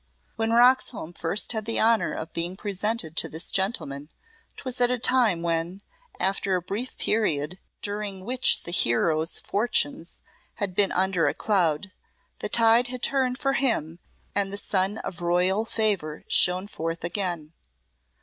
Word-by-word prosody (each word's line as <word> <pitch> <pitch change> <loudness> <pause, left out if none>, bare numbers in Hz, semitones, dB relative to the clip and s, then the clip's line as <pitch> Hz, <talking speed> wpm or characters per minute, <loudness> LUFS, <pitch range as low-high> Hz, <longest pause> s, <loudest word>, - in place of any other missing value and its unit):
When 225 0 -1
Roxholm 240 -6 +3
first 175 +5 -1
had 220 -3 -3
the 225 - -1
honour 225 0 +3
of 160 +1 -6
being 175 +3 -2
presented 200 -4 -3
to - - 0
this 160 +2 -3
gentleman 150 -8 -2 0.5
'twas 255 -2 -5
at 245 - +4
a 250 - +1
time 235 -8 +2
when, 170 +3 -1 0.4
after 195 0 0
a 180 - -1
brief 210 +8 -4
period 180 -5 0 0.2
during 205 -2 -4
which 255 +2 +3
the 170 - -3
hero's 155 +3 +2
fortunes 200 -6 -1 0.4
had 200 -3 -3
been 195 +2 +2
under 185 -4 +2
a - - 0
cloud, 185 -4 +1 0.5
the - - -4
tide 230 +1 +4
had 250 0 -7
turned 260 -2 +1
for 275 0 0
him 175 - 0 0.3
and 200 -1 0
the 200 - -3
sun 200 0 0
of 175 - -7
royal 180 +5 +2
favour 200 -10 -1
shone 180 +1 +4
forth 165 -4 -4
again. 170 -3 -2
195 Hz, 150 wpm, -26 LUFS, 170-225 Hz, 0.5 s, at